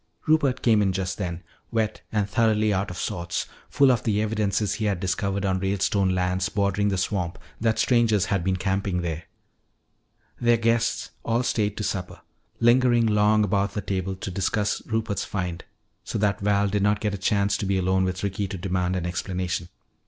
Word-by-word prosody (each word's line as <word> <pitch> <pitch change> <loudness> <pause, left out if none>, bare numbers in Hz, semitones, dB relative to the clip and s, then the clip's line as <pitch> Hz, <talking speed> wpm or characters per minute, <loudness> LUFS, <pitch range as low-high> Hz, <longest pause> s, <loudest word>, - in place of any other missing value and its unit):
Rupert 145 -5 +2
came 110 -3 +4
in 95 -2 +1
just 95 +1 -3
then, 90 -3 -4 0.3
wet 110 -1 -1
and 105 -2 0
thoroughly 110 0 +2
out 95 +2 -1
of 90 - -7
sorts, 85 -2 -3 0.2
full 140 -2 +5
of 120 - +1
the 105 -2 0
evidences 105 -2 0
he 110 - -2
had 100 -4 0
discovered 100 +2 -1
on 95 -1 +1
Ralestone 95 0 +1
lands 90 0 0
bordering 100 0 +1
the 95 -2 0
swamp 90 -2 -1 0.2
that 110 0 +1
strangers 115 -5 +3
had 100 -4 0
been 95 +1 +1
camping 95 -1 -1
there. 85 -1 -4 1.1
Their 120 -1 +4
guests 115 0 0
all 120 +2 +1
stayed 105 -4 0
to 105 - -2
supper, 90 -3 -3 0.4
lingering 120 0 +4
long 105 0 +3
about 100 0 0
the 105 - -1
table 95 -1 -2
to 95 +1 -6
discuss 100 +3 -1
Rupert's 110 -2 -1
find, 90 -3 -4 0.4
so - - -4
that 100 -1 +1
Val 100 0 +2
did 100 +1 0
not 105 +1 +2
get 105 -2 -1
a - - -2
chance 100 +1 +1
to 100 - -3
be 100 0 +1
alone 95 0 +2
with 95 0 -2
Ricky 100 0 -1
to 95 0 -5
demand 90 0 -1
an 90 -2 -2
explanation. 90 0 -3
100 Hz, 185 wpm, -25 LUFS, 95-110 Hz, 1.1 s, full